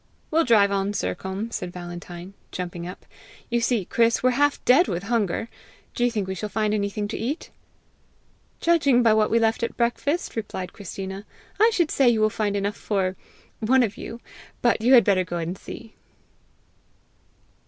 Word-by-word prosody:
"We'll 325 +2 +3
drive 210 -5 +5
on, 200 +1 0
Sercombe," 200 +3 -3
said 180 -1 -4
Valentine, 175 +1 -8 0.2
jumping 175 -1 -5
up. 180 - -10 0.5
"You 235 0 +2
see, 230 -5 +1
Chris, 230 +3 +2
we're 255 - +4
half 285 +3 +2
dead 270 +8 +6
with 180 0 -3
hunger! 225 -1 0 0.5
Do 240 - -1
you 245 - +4
think 210 -5 -2
we 190 - -2
shall 210 +3 -5
find 215 +1 0
anything 205 0 -1
to - - -4
eat?" 275 +8 -4 1.1
"Judging 285 -8 +3
by 225 -2 +5
what 215 -1 +3
we 230 - +3
left 225 0 +2
at 230 - -3
breakfast," 255 +7 -1
replied 190 -5 -5
Christina, 195 0 -6 0.4
"I 445 +2 +6
should 345 -7 +1
say 270 -3 +4
you 230 -2 +2
will 215 0 +3
find 210 -2 -1
enough 200 +1 -1
for 190 -3 -1 0.4
one 250 +3 +4
of 210 -3 -2
you; 230 +1 -8 0.4
but 235 -2 +3
you 245 +4 +4
had 235 - +8
better 190 -2 +3
go 175 -1 -4
and 170 +2 -3
see." 225 +4 -10
215 Hz, 175 wpm, -24 LUFS, 190-240 Hz, 1.1 s, had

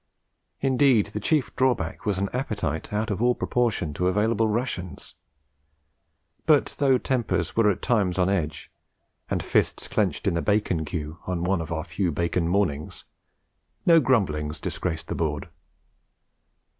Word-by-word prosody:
Indeed, 130 -6 +3
the 105 - -2
chief 145 +6 0
drawback 125 -9 0
was 100 -3 +1
an 100 +1 0
appetite 105 - -3
out 105 +1 -1
of 105 - -2
all 125 0 +3
proportion 115 -11 0
to 90 +4 0
available 110 +4 +2
rations; 105 - -3 1.3
but, 150 -3 +3
though 135 -2 +4
tempers 125 -2 -1
were 110 -2 +4
at 95 - -2
times 100 -7 +1
on 90 -1 +3
edge, 80 -6 -2 0.6
and - - -1
fists - - 0
clenched - - 0
in - - +2
the 85 - 0
bacon 100 -6 +1
queue, 75 +1 -5
on 90 -2 -2
one 95 -1 +1
of 80 - -6
our 80 -1 -2
few 85 +2 -1
bacon 85 +2 0
mornings, 85 -6 -1 0.8
no 165 -1 +7
grumbling 95 - +1
disgraced 80 +1 -4
the - - -3
board. 75 -3 -2
100 Hz, 145 wpm, -25 LUFS, 80-120 Hz, 1.3 s, no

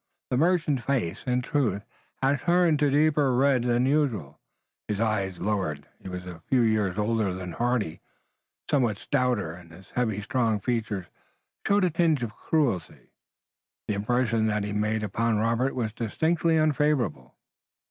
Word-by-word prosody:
The 125 - +2
merchant's 155 -5 +2
face, 125 -12 -1
in 125 0 +1
truth, 120 -8 0 0.4
had 135 +1 +3
turned 170 -3 +3
to 145 -1 +3
deeper 145 -2 +3
red 135 -1 +3
than 120 +1 +2
usual, 125 - 0 0.5
and 105 - -1
his - - -7
eyes 100 -5 -1
lowered. 90 -7 -2
He - - -8
was 90 0 -6
a 85 -2 -9
few 130 -2 +3
years 105 -4 +1
older 105 -3 0
than 90 -1 -6
Hardy, 120 -5 -1 0.7
somewhat 125 -8 +1
stouter, 125 - 0
and 85 -1 -13
his 95 +3 -15
heavy 110 -5 -1
strong 115 -2 +1
features 110 -4 -2 0.6
showed 200 0 +3
a 180 - +2
tinge 160 -5 +2
of 115 -2 -4
cruelty. 120 - -1 0.8
The - - 0
impression 115 +1 +1
that 105 -1 0
he 105 0 -3
made 110 +1 0
upon 110 +2 0
Robert 115 +4 +1
was 110 -4 -2
distinctly 160 +8 +1
unfavorable. 145 - +1
115 Hz, 155 wpm, -26 LUFS, 100-140 Hz, 0.8 s, had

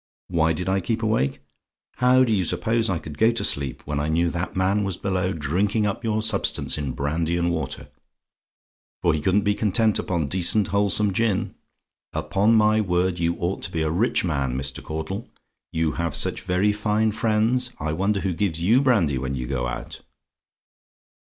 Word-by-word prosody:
"WHY 80 -2 +2
DID 90 +3 -4
I 95 +1 +2
KEEP 115 +5 -2
AWAKE? 90 -12 0 0.6
"How 125 +1 +5
do 115 -3 +1
you 95 -3 +2
suppose 115 +5 0
I 90 - 0
could 75 -2 -9
go 110 - +5
to 115 - -2
sleep 70 -2 -1
when 75 -1 -2
I 75 - -1
knew 85 +2 +1
that 85 +2 -4
man 95 +3 +1
was 95 -3 -2
below 95 -1 -1
drinking 95 +7 0
up 100 +3 -2
your 110 -1 0
substance 110 - 0
in 70 -4 -3
brandy 80 +5 -1
and 85 0 +1
water? 80 -2 -4 1.2
for 85 - +3
he 80 - -1
couldn't 100 +4 +2
be 105 - +2
content 110 +1 +2
upon 85 -4 -1
decent, 95 +6 +1
wholesome 100 0 +1
gin. 110 -1 0 0.6
Upon 105 +4 +2
my 110 0 +4
word, 90 -2 0
you 85 0 +1
ought 90 +3 -3
to - - -4
be 80 -1 -1
a 80 - 0
rich 105 +9 +1
man, 70 -6 -1
Mr. 65 -1 -4
Caudle. 80 +7 -5 0.4
You 80 -1 0
have 85 -1 -2
such - - 0
very 95 +3 +1
fine 105 +1 +1
friends, 115 +3 +1
I 75 +1 -2
wonder 100 +4 0
who 95 -2 -1
gives 85 -1 -1
you 110 +10 +4
brandy 95 - +2
when 65 +1 -3
you 60 -1 -4
go 60 -1 -2
out! 60 - -6
95 Hz, 185 wpm, -24 LUFS, 80-105 Hz, 1.2 s, How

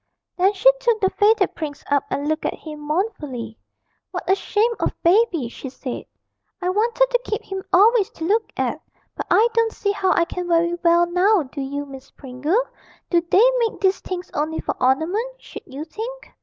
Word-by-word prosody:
Then 380 +3 +3
she 450 +6 +6
took 475 -3 +1
the 380 -2 +2
faded 415 -1 +3
prince 295 -3 -6
up 285 -1 +2
and 285 +1 -2
looked 310 +1 -1
at - - -1
him 305 -2 -9
mournfully. 295 - -3 0.5
'What - - -6
a 380 - +5
shame 425 +4 +1
of - - -2
Baby!' 345 - +3
she 260 +3 -8
said; 255 -1 -6 0.5
'I 360 - -1
wanted 460 +5 +2
to - - +2
keep 430 -3 -3
him 385 0 -5
always 415 +2 +5
to 325 - -8
look 435 +5 +1
at - - -1 0.3
but - - -5
I 450 - +5
don't 460 -1 +2
see 405 - -1
how 380 -2 +1
I 340 - +2
can 360 +1 -5
very 340 0 +2
well 340 0 +5
now, 365 +2 +3
do 275 +1 -7
you, 285 +2 -4
Miss 270 -1 -11
Pringle? 290 - -1 0.5
Do 345 -1 +4
they 420 +8 +6
make 460 -2 -1
these 385 -1 +2
things 365 -1 -6
only 310 +2 -2
for - - -2
ornament, 360 - 0
should - - -11
you 280 +4 -7
think?' 465 +9 -7
360 Hz, 195 wpm, -22 LUFS, 300-430 Hz, 0.5 s, she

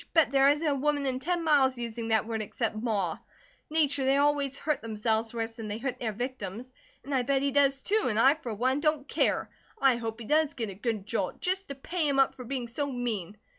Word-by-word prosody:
Bet 320 -3 +5
there 275 0 +5
isn't 300 +3 +1
a 290 - +3
woman 285 +1 0
in 260 -1 0
ten 345 +4 -1
miles 275 -5 +3
using 235 -1 -4
that 220 -2 +2
word 225 -1 -3
except 220 +1 -2
Ma 210 -7 -1 0.5
nature 290 -3 +2
they 270 +1 +3
always 285 -1 +2
hurt 300 -2 -1
themselves 220 0 -1
worse 230 -1 -3
than 225 -1 -8
they 210 0 -3
hurt 250 +1 -4
their 225 -3 -2
victims. 245 0 -5 0.3
And 280 - -5
I 260 - +3
bet 270 +2 +1
he 280 - +1
does, 275 -1 +3
too, 425 +2 +2
and 215 -3 0
I, 265 +5 +6
for 300 -7 -7
one, 255 +6 +1
don't 305 -2 0
care. - - 0 0.3
I 265 -3 +4
hope 225 -1 -5
he 230 - -7
does 305 +2 +2
get 225 -5 -3
a - - -7
good 210 0 -3
jolt, - - -2
just 380 +2 -1
to 280 - -6
pay 315 +4 -2
him 280 -1 +1
up 270 -1 +4
for 255 - -9
being 255 -1 -3
so 280 +4 -2
mean." 220 -6 -3
260 Hz, 235 wpm, -29 LUFS, 225-285 Hz, 0.5 s, I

